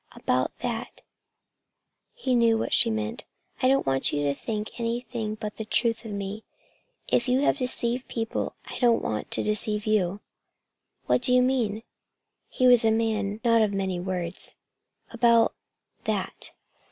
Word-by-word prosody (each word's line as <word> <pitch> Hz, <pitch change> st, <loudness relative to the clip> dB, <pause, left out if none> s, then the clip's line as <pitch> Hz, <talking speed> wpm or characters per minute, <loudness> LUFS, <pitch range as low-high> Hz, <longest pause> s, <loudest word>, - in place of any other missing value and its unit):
"About 130 Hz, 0 st, 0 dB
that" 235 Hz, -1 st, -4 dB, 1.1 s
he 265 Hz, -, -1 dB
knew 230 Hz, -2 st, +4 dB
what -, -, -2 dB
she 235 Hz, -, +6 dB
meant 220 Hz, +2 st, -3 dB, 0.4 s
"I 255 Hz, -, +4 dB
don't 270 Hz, +1 st, +3 dB
want 135 Hz, 0 st, +1 dB
you 145 Hz, -, -1 dB
to 140 Hz, -1 st, +1 dB
think 215 Hz, +8 st, -5 dB
anything 230 Hz, -2 st, -3 dB
but 215 Hz, -1 st, -6 dB
the 220 Hz, -, -3 dB
truth 230 Hz, +1 st, 0 dB
of 220 Hz, -, -6 dB
me. 200 Hz, +2 st, -5 dB, 0.7 s
If 240 Hz, -, +2 dB
you 255 Hz, +2 st, +2 dB
have 285 Hz, -, +2 dB
deceived 250 Hz, -1 st, -1 dB
people, 225 Hz, -1 st, -3 dB
I -, -, -7 dB
don't 240 Hz, -2 st, +3 dB
want 110 Hz, -, -3 dB
to -, -, +1 dB
deceive 210 Hz, 0 st, 0 dB
you." 200 Hz, -3 st, +1 dB, 0.9 s
"What -, -, +2 dB
do 250 Hz, 0 st, +4 dB
you 250 Hz, -, +5 dB
mean?" 230 Hz, -5 st, 0 dB, 0.7 s
He 255 Hz, -, 0 dB
was 245 Hz, -2 st, +7 dB
a 225 Hz, -, +4 dB
man 220 Hz, -2 st, 0 dB
of 220 Hz, -, -16 dB
not 230 Hz, -1 st, +5 dB
very 215 Hz, -, +4 dB
many 195 Hz, -3 st, -2 dB
words. 180 Hz, -1 st, -4 dB, 0.6 s
"About 235 Hz, -1 st, +4 dB, 0.5 s
that!" -, -, -3 dB
225 Hz, 160 wpm, -26 LUFS, 205-240 Hz, 1.1 s, was